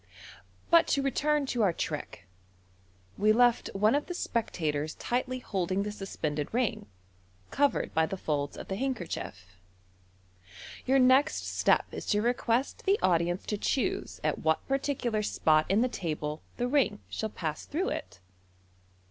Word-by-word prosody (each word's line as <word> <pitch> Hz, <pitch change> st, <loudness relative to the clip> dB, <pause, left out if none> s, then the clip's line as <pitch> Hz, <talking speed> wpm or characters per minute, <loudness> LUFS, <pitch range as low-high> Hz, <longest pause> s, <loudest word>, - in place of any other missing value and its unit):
But 335 Hz, -1 st, +6 dB
to 280 Hz, -, +1 dB
return 295 Hz, +2 st, +1 dB
to 245 Hz, -3 st, -1 dB
our 195 Hz, -5 st, +3 dB
trick: 150 Hz, -11 st, -5 dB, 0.9 s
we 210 Hz, +2 st, +5 dB
left 240 Hz, +1 st, +3 dB
one 210 Hz, +3 st, +4 dB
of 290 Hz, +1 st, 0 dB
the 355 Hz, -, -4 dB
spectators 155 Hz, -, -2 dB
tightly 255 Hz, +1 st, -2 dB
holding 190 Hz, -5 st, -1 dB
the 210 Hz, -, -3 dB
suspended 155 Hz, -7 st, -4 dB
ring, 240 Hz, -, -1 dB, 0.6 s
covered 285 Hz, 0 st, +1 dB
by 160 Hz, 0 st, +3 dB
the 195 Hz, -, -4 dB
folds 145 Hz, -5 st, -2 dB
of -, -, -8 dB
the 190 Hz, -, -3 dB
handkerchief. 160 Hz, -, -4 dB, 1.3 s
Your 265 Hz, +1 st, +4 dB
next 265 Hz, +4 st, +4 dB
step -, -, +2 dB
is -, -, -7 dB
to 210 Hz, -1 st, +2 dB
request 240 Hz, +1 st, 0 dB
the 395 Hz, +1 st, +5 dB
audience 175 Hz, 0 st, +2 dB
to 210 Hz, -, -2 dB
choose 370 Hz, -, -1 dB
at -, -, 0 dB
what 160 Hz, 0 st, 0 dB
particular 270 Hz, -5 st, 0 dB
spot 155 Hz, -6 st, +2 dB
in 200 Hz, +4 st, +3 dB
the 250 Hz, -, +3 dB
table 155 Hz, -8 st, -4 dB, 0.2 s
the 245 Hz, -, 0 dB
ring 245 Hz, -6 st, +1 dB
shall 220 Hz, -1 st, -4 dB
nass 155 Hz, -3 st, -3 dB
through 355 Hz, +6 st, -1 dB
it. 100 Hz, -, -6 dB
215 Hz, 150 wpm, -29 LUFS, 165-260 Hz, 1.3 s, But